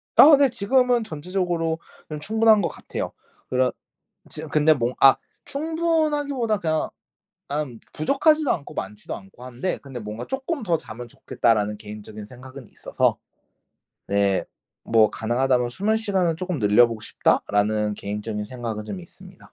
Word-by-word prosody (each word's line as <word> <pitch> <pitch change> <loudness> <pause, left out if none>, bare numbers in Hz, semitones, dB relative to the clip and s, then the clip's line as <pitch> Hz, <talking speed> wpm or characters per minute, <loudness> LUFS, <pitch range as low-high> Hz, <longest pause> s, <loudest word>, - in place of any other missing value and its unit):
아 305 0 +10
네. 280 -2 +4
지금은 245 +2 +2
전체적으로는 170 -1 -2 0.4
충분한 220 +3 +4
것 170 - +1
같아요. - - -5 0.4
그런 130 0 +2 0.6
지금 - - -7
근데 155 +1 +4
뭐 125 -3 -1
아 135 - +8 0.3
충분하기보다 295 -6 0
그냥 160 -4 -1 0.6
난 145 -5 -3
부족하지도 295 - +2
않고 145 - -4
많지도 105 +2 -5
않고 95 +5 -13
한데 130 +9 -3
근데 135 -3 -9
뭔가 105 +2 -6
'쪼끔 270 +2 -3
더 170 -5 +1
자면 120 -3 -9
좋겠다.'라는 105 -3 0
개인적인 105 0 -9
생각은 130 +2 -12
있어서. - - 0 0.9
네 100 -1 +1 0.4
뭐 110 -2 +4
'가능하다면 125 +2 +1
수면 205 - 0
시간을 190 -7 +1
조금 180 -2 -3
늘려보고 115 +1 +4
싶다.'라는 105 0 +1
개인적인 105 +1 -4
생각은 115 -2 -5
좀 185 - -6
있습니다. 185 +1 -12
145 Hz, 330 characters per minute, -24 LUFS, -, 0.9 s, 아